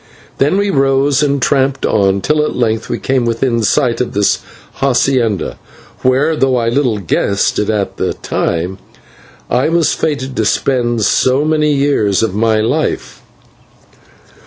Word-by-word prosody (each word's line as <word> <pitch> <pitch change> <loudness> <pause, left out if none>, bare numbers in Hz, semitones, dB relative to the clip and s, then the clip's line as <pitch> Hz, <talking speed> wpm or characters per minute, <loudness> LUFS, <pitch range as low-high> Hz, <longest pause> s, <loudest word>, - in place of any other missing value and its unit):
Then 145 +8 +2
we 200 0 +1
rose 135 -1 +2
and 140 -1 +1
tramped 135 0 +1
on, 100 -1 +1
till 150 +5 +1
at - - -3
length 115 -2 -1
we 120 - -2
came 130 0 0
within 115 0 0
sight 120 +3 +1
of 125 - -3
this 100 0 +1 0.4
/hacienda/, 125 - 0 0.4
where, 135 +5 +2
though 135 -3 +1
I 115 -1 0
little 125 -3 0
guessed 100 +1 0
it 105 - -1
at 105 -3 -2
the - - -2
time, 90 +3 -3 0.7
I 125 +5 +1
was 165 -1 +2
fated 135 -3 -3
to 110 - +1
spend 120 -1 0
so 130 +7 +2
many 155 -1 +1
years 135 -9 +1
of 110 -4 -1
my 110 +1 +1
life. 110 - -2
125 Hz, 150 wpm, -14 LUFS, 110-140 Hz, 0.7 s, Then